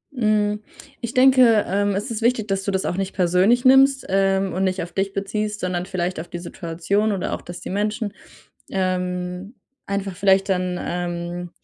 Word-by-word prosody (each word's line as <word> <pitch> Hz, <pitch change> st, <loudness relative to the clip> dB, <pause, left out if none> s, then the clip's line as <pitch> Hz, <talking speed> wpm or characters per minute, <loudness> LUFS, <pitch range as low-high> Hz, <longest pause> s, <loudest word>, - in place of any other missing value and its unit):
Mhm, 210 Hz, -3 st, +1 dB, 0.4 s
ich 235 Hz, -1 st, -4 dB
denke, 255 Hz, -4 st, +6 dB
ähm, 200 Hz, +1 st, +1 dB
es 210 Hz, +5 st, -3 dB
ist 225 Hz, 0 st, -3 dB
wichtig, 230 Hz, -2 st, +1 dB
dass 195 Hz, 0 st, -1 dB
du 200 Hz, -, -1 dB
das 190 Hz, 0 st, -1 dB
auch 175 Hz, -, -2 dB
nicht 195 Hz, 0 st, -2 dB
persönlich 190 Hz, +7 st, +3 dB
nimmst, 270 Hz, +1 st, +5 dB
ähm, 195 Hz, 0 st, +1 dB
und 190 Hz, -, -1 dB
nicht 185 Hz, -1 st, 0 dB
auf 175 Hz, -, -9 dB
dich 195 Hz, 0 st, -1 dB
beziehst, 210 Hz, +1 st, -3 dB
sondern 180 Hz, 0 st, -2 dB
vielleicht 180 Hz, -2 st, -2 dB
auf 170 Hz, -, -6 dB
die 175 Hz, -, -6 dB
Situation 175 Hz, +5 st, -1 dB
oder 195 Hz, -, -2 dB
auch, -, -, -4 dB
dass 175 Hz, 0 st, -9 dB
die -, -, -6 dB
Menschen, 210 Hz, +1 st, -2 dB, 0.6 s
ähm, 180 Hz, +2 st, -2 dB, 0.3 s
einfach 200 Hz, -1 st, -3 dB
vielleicht 195 Hz, 0 st, +3 dB
dann, 180 Hz, -1 st, 0 dB
ähm, 175 Hz, 0 st, -4 dB
195 Hz, 180 wpm, -22 LUFS, 180-210 Hz, 0.6 s, denke